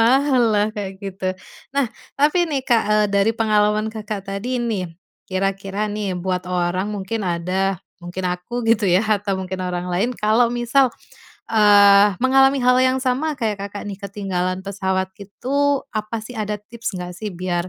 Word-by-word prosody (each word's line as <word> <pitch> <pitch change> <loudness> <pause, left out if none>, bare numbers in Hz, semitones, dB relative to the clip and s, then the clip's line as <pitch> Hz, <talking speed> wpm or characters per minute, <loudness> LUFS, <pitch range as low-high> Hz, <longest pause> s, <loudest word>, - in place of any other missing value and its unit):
mahal 260 +2 +4
lah 205 0 +3
kayak 200 -2 -4
gitu. 195 -1 -6 0.5
Nah 280 - +4 0.3
tapi 315 +4 +3
nih, 280 -3 0
Kak, 235 -4 +3
eee, 210 0 +4
dari 200 +2 +3
pengalaman 215 0 +2
Kakak 210 -2 -5
tadi 205 +6 -3
nih, 220 -7 -2 0.4
kira-kira 195 +2 -1
nih, 200 -3 -2
buat 180 0 -2
orang 180 +2 0
mungkin 210 +2 -3
ada 185 +1 -1 0.2
mungkin 175 +2 -6
aku 235 +7 -5
gitu 210 -4 +3
ya 185 +5 +3
atau 205 -2 0
mungkin 190 0 -5
orang 180 -1 -3
lain, 205 +8 +1
kalau 220 +3 +3
misal, 245 +2 +2 0.6
eee, 205 -2 +6
mengalami 270 +1 +5
hal 250 0 +5
yang 260 0 +3
sama 275 +4 0
kayak 215 -5 -2
Kakak 200 +1 -6
nih 195 -1 -7
ketinggalan 190 -2 -2
pesawat 190 -1 -2
itu 280 +7 -1
apa 215 +1 -3
sih 250 - -9
ada 210 0 -2
tips 220 -1 -6
nggak 180 0 -5
sih 210 +4 -5
biar, 180 -1 -3
205 Hz, 165 wpm, -21 LUFS, 190-235 Hz, 0.6 s, eee